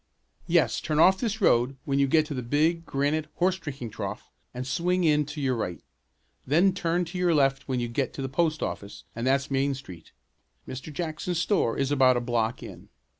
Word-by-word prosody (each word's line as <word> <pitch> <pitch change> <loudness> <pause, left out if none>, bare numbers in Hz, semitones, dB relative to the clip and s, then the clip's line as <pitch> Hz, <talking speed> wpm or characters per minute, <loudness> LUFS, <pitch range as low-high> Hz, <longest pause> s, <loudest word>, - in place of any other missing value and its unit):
"Yes, - - +2
turn 155 - -2
off 190 +3 +6
this 220 -2 -2
road 125 -6 +3
when 140 0 0
you 140 - +3
get 155 +3 +3
to 150 - -5
the 130 - -3
big 155 +7 +1
granite 145 +3 0
horse 185 +1 +1
drinking 135 - -6
trough - - -6 0.2
and 125 +1 -5
swing 175 +8 0
in 150 -3 +3
to 150 +1 -7
your 130 -3 0
right. 90 -8 -3 0.6
Then 175 +7 +3
turn 175 -1 0
to 175 +2 -6
your 175 -2 +3
left 135 -2 +2
when 130 -2 -1
you 120 - -1
get 120 +2 -2
to 135 - -5
the - - -1
post 155 +3 0
office 100 0 -6
and 115 +2 -2
that's 140 +1 +1
Main 135 +1 +1
Street. 90 -11 -11 0.6
Mr. 135 +4 -7
Jackson's 165 +2 -3
store 175 - +1
is 135 0 0
about 130 -3 +4
a - - +2
block 120 0 -1
in." - - -11
140 Hz, 205 wpm, -27 LUFS, 130-165 Hz, 0.6 s, off